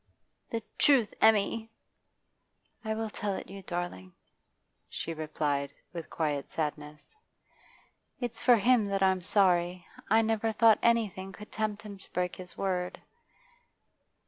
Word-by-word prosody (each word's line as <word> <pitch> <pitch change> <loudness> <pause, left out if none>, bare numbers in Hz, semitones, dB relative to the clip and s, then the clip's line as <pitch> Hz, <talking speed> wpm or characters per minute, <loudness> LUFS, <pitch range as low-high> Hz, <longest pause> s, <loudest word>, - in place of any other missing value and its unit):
'The 230 -1 -3 0.2
truth, 265 -7 +4
Emmy!' 220 +1 +3 1.1
'I 220 -1 -2
will 220 0 -3
tell 200 -1 -2
it - - -7
you, 195 0 -8
darling,' 175 - -5 0.8
she 165 - -4
replied, 150 -3 -2 0.2
with 170 -2 -6
quiet 145 -4 -2
sadness. 150 - -5 1.0
'It's 245 -3 -4
for 245 - +6
him 230 0 +3
that 195 -1 0
I'm 190 -1 +3
sorry. 180 -2 +2 0.2
I 220 +2 +5
never 225 0 +1
thought 220 0 +5
anything 205 -5 +1
could 210 +1 -11
tempt 215 0 -2
him 200 -2 -9
to - - -18
break 180 0 -1
his 180 -1 -11
word. 180 -2 -2
195 Hz, 130 wpm, -30 LUFS, 175-220 Hz, 1.1 s, for